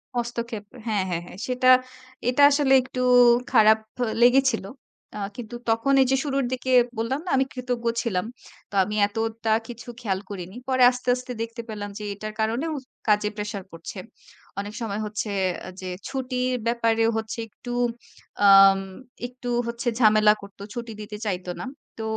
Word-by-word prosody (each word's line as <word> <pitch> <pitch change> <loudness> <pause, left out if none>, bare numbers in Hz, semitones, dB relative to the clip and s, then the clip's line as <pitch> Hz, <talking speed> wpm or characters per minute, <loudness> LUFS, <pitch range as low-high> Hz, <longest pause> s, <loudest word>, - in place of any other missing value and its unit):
হস্তক্ষেপ 235 -2 -3 0.2
হ্যাঁ, 210 -4 +1
হ্যাঁ, 170 -1 -2
হ্যাঁ। 180 - -12
সেটা, 255 0 0 0.6
এটা 250 +3 +2
আসলে 280 -2 +3
একটু 255 0 -5 0.5
খারাপ 220 -3 +6 0.4
লেগেছিল। 255 -2 +4 0.5
আ - - -5 0.2
কিন্তু 240 -1 -7
তখন 225 +5 +2
এই 260 - +4
যে - - +4
শুরুর 275 -2 0
দিকে 255 0 -2 0.3
বললাম 230 +5 -1
না, - - -4
আমি 265 - +3
কৃতজ্ঞ 250 -2 -4 0.2
ছিলাম? 190 -5 -1 0.4
তো - - -22
আমি 210 +3 -4
এতটা 225 +1 -2 0.2
কিছু 240 0 -9
খেয়াল 195 -5 -1
করিনি। 185 -1 -7
পরে 260 -1 +3
আস্তে, 250 0 -5
আস্তে 250 0 -7
দেখতে 230 +1 -5
পেলাম 205 -1 -5
যে, 210 - -7
এটার 215 +1 -7
কারণেও 235 +9 0 0.3
কাজে 210 0 +3
প্রেশার 210 -2 -4
পড়ছে। 165 - -9 0.6
অনেক 205 +1 -5
সময় 215 -2 -3
হচ্ছে 210 0 -4 0.5
যে, 185 - -6 0.2
ছুটির 255 -1 -2
ব্যাপারে 230 -1 +2
হচ্ছে 220 +1 -4
একটু, 245 +3 -10 0.7
আম 195 -1 +8 0.5
একটু 250 0 -10 0.2
হচ্ছে 235 +2 -4
ঝামেলা 215 -2 +6
করতো, 200 0 -13
ছুটি 235 -1 -6
দিতে 210 0 -7
চাইত 185 -3 -2
না। - - -5 0.3
তো 225 - -5
230 Hz, 155 wpm, -24 LUFS, 210-250 Hz, 0.7 s, আম